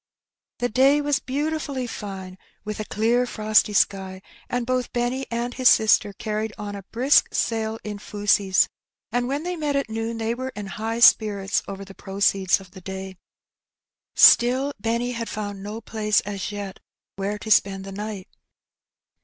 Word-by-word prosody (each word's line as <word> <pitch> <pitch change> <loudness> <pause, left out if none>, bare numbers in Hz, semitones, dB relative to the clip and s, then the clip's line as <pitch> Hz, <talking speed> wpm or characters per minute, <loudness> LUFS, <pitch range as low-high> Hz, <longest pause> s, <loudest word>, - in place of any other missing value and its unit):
The 245 - 0
day 270 +5 +4
was 290 -1 +1
beautifiiUy 280 -1 -3
fine, 190 -4 -7 0.3
with 210 0 -5
a 215 - -3
clear 235 +4 +1
frosty 215 -2 +2
sky, 190 -1 0 0.3
and 245 -1 -1
both 255 0 -1
Benny 245 +2 -1
and 235 +1 -3
his 255 -1 +5
sister 215 -1 +4
carried 215 +2 -3
on 205 -1 -6
a 200 - -7
brisk 260 +5 +4
sale 220 -1 -1
in 210 -1 -6
fusees, 205 -2 +2 0.4
and 245 0 0
when 280 +4 -2
they 360 +1 -3
met 300 -3 -2
at 275 -5 -1
noon 225 +1 -3
they 225 0 -1
were 260 +2 -4
in 205 0 -5
high 225 +4 -4
spirits 200 -4 +4
over 195 0 -7
the 195 - -12
proceeds 195 -1 +1
of 190 -2 -15
the 185 - -12
day. 190 0 -7 1.0
Still 260 +4 +6
Benny 235 +3 -1
had 230 -1 -4
found 205 -2 -5
no 210 +3 -6
place 215 -2 +1
as 200 0 -5
yet 200 -2 -6 0.4
where 200 +2 -3
to 220 +1 -6
spend 195 -1 +3
the 195 - -7
night. 205 -1 -6
215 Hz, 165 wpm, -24 LUFS, 200-245 Hz, 1.0 s, Still